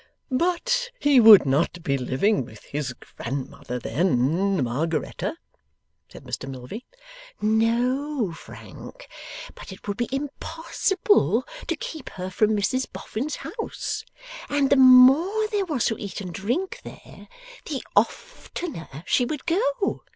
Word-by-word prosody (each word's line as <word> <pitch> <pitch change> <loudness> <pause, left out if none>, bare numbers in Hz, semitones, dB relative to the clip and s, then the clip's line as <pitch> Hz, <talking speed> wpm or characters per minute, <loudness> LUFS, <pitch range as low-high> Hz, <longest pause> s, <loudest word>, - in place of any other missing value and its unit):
'But 360 - +1
he 285 -3 +5
would 220 -6 +9
not 160 +5 0
be 140 - +1
living 135 - +1
with 110 -2 -13
his 145 -2 -4
grandmother 130 0 -6
then, 165 +6 +1
Margaretta,' 150 +7 -2 0.7
said - - -13
Mr 135 - -5
Milvey. 130 - -8 0.5
'No, 235 - +1
Frank, - - -12 0.5
but - - -11
it 190 - -12
would 205 0 -2
be 240 - -1
impossible 325 +8 0 0.2
to 335 - 0
keep 310 -1 -7
her 185 0 -6
from 215 +3 +2
Mrs 250 +6 -1
Boffin's 270 +8 -4
house; 445 0 -5 0.5
and 285 -2 +1
the - - +7
MORE 270 +11 +7
there 410 -2 0
was 295 -9 -1
to 225 - 0
eat 200 0 -6
and 185 -4 -6
drink 330 - -2
there, - - -12 0.4
the 280 -5 -3
oftener 315 - -2
she 250 - +2
would 280 +3 -4
go. 445 +5 0
235 Hz, 130 wpm, -24 LUFS, -, 0.7 s, would